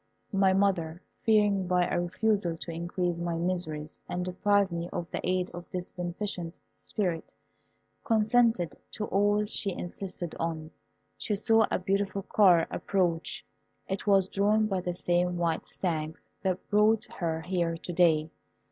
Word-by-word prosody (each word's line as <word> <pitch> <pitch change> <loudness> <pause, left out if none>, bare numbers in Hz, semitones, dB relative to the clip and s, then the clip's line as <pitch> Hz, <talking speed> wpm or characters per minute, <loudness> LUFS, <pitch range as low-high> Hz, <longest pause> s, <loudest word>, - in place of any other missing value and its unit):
My 195 -1 +4
mother, 185 -4 +1 0.2
fearing 205 -4 +3
by 180 -1 +3
a - - 0
refusal 180 -1 0
to 170 - -6
increase 175 +1 -2
my 170 -1 -1
miseries 165 -3 -2
and 180 0 -2
deprive 200 +1 +2
me 170 0 -3
of 175 - -3
the - - -2
aid 185 0 0
of 175 0 -9
this 180 -1 -5
beneficent 175 -1 -3 0.2
spirit, 175 -6 -3 0.7
consented 225 - +3 0.2
to 215 - -2
all 205 +1 +2
she 205 -1 -2
insisted 175 -1 -5
on. 160 -1 -3 0.5
She 210 - 0
saw 225 +1 +3
a - - +1
beautiful 195 +1 -1
car 185 -5 +5
approach; 175 -4 -1 0.4
it 195 +2 -4
was 195 -2 +5
drawn 210 +3 +2
by 195 -3 -1
the 180 0 -2
same 175 0 +1
white 170 -1 -1
stags 160 -3 -3 0.2
that 190 -1 -2
brought 210 +1 +4
her 160 -2 -3
here 170 -1 -1
to 175 +1 -6
day. 160 -3 +3
180 Hz, 145 wpm, -29 LUFS, 170-200 Hz, 0.7 s, car